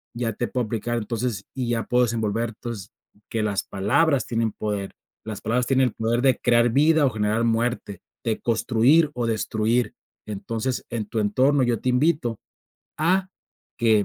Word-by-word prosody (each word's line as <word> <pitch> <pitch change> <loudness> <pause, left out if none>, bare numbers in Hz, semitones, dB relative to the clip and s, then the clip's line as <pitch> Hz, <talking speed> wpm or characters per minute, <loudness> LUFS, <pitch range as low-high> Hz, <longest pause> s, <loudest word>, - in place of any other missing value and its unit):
ya 120 -1 -1
te 120 - -2
puedo 125 -3 -1
aplicar 120 +2 -2
entonces, 115 -2 -3
y 130 -3 -3
ya 115 -1 0
puedo 125 0 +3
desenvolver, 115 0 -1
entonces, 110 -3 -7 0.4
que 110 -1 -1
las 100 -2 0
palabras 130 +9 +1
tienen 115 -2 -1
poder. 105 -2 -3 0.3
Las 110 -2 -6
palabras 120 +3 0
tienen 130 -2 +3
el - - -13
poder 115 +2 0
de 130 -2 +3
crear 120 0 +4
vida 155 +2 +4
o - - +4
generar 110 +2 0
muerte, 115 -4 -1 0.2
de 110 -2 -1
construir 125 +7 +3
o 120 -1 -1
destruir. 110 +1 0 0.3
Entonces, 115 +4 -3
en 115 -3 -3
tu 110 - -2
entorno, 130 +7 +3
yo 120 -3 0
te 130 - 0
invito 125 -4 +1 0.6
a 185 +4 +2 0.5
que 110 -3 +4
115 Hz, 165 wpm, -24 LUFS, 110-125 Hz, 0.6 s, crear